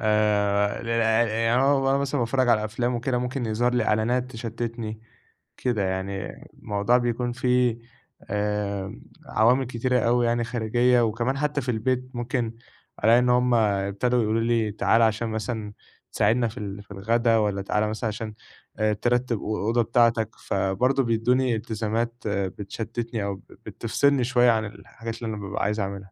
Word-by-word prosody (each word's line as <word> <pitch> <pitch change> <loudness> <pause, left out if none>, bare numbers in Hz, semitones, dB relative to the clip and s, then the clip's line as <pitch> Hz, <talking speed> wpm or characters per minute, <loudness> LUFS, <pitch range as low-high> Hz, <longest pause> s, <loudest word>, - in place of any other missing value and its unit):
يعني 110 +2 +2
أنا 135 +3 +4
وأنا 135 0 +2
مثلًا 140 -1 -1
باتفرّج 125 +2 +1
على 110 -2 +3
أفلام 120 +3 -1
وكده 120 +1 -1
ممكن 125 0 -3
يظهر 120 +3 +1
لي - - +2
إعلانات 120 +4 +1
تشتِّتني، 115 -1 -5 0.6
كده 115 -6 0
يعني 95 +1 -3 0.3
الموضوع 105 +4 +1
بيكون 120 0 -1
في 125 -1 +1 0.5
آآ، 105 -1 -2 0.3
عوامل 125 +4 +3
كتيرة 125 +1 0
أوي 120 +2 +2
يعني 120 0 +1
خارجية 120 +2 +2
وكمان 120 +4 0
حتى 150 -1 0
في 125 - -5
البيت 125 +3 -1
ممكن 120 -1 -2 0.5
ألاقي 115 +3 +6
إن 125 0 +2
هُم 125 0 +3
ابتدوا 105 +3 +1
يقولوا 110 +1 +1
لي 115 -2 +1
تعالَ 115 +2 +2
عشان 110 +1 +2
مثلًا 110 -1 -4 0.4
تساعدنا 115 +3 +2
في 115 +3 -8
ال 100 0 -6
في 105 - -20
الغدا 115 +4 +2
والَّا 105 -2 0
تعالَ 105 +2 0
مثلًا 110 +1 -3
عشان 110 0 -5 0.5
آآ 110 0 +2
ترتِّب 120 +3 0
أ - - -9
الأوضة 110 +2 0
بتاعتك، 115 -1 +2 0.2
فبرضه 125 +8 +1
بيدّوني 120 +2 +1
إلتزامات 110 +1 -2
بتشتِّتني 105 +3 -3
أو 100 0 -2
بت 95 - -18
بتفصلني 135 +4 +1
شوية 120 -1 +4
عن 110 -1 0
الحاجات 115 +1 -8
اللي 110 -1 -3
أنا - - -7
بابقى 100 +1 -3
عايز 105 +2 0
أعملها. 100 -1 -5
115 Hz, 155 wpm, -25 LUFS, 105-125 Hz, 0.6 s, ألاقي